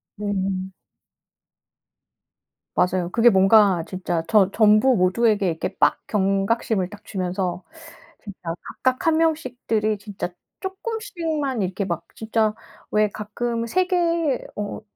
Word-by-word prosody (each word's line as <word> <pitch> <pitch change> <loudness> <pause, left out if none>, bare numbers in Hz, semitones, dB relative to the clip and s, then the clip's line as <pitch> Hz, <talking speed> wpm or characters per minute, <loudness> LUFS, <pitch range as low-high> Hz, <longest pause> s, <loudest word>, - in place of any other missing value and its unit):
네. 195 -2 -2 2.1
맞아요. 180 -1 +1
그게 240 +3 +5
뭔가 195 -3 +5
진짜 180 -3 -2
저 205 -4 +4
전부 215 +4 +5
모두에게 205 +2 +2
이렇게 165 -2 -3
빡 145 +1 +3
경각심을 195 0 0
딱 205 +1 -12
주면서 185 -2 -3 0.6
진짜 200 -3 -10 0.4
각각 255 +4 +1
1 320 -1 +4
명씩들이 245 -9 0
진짜 200 -2 -6 0.3
쪼끔씩만 370 - -3
이렇게 190 +1 -2
막 170 -2 -3
진짜 220 -1 0 0.4
왜 215 0 +3
가끔 230 +3 -3
세계 340 -3 +1
어 205 +1 -4
210 Hz, 220 characters per minute, -23 LUFS, 190-255 Hz, 2.1 s, 그게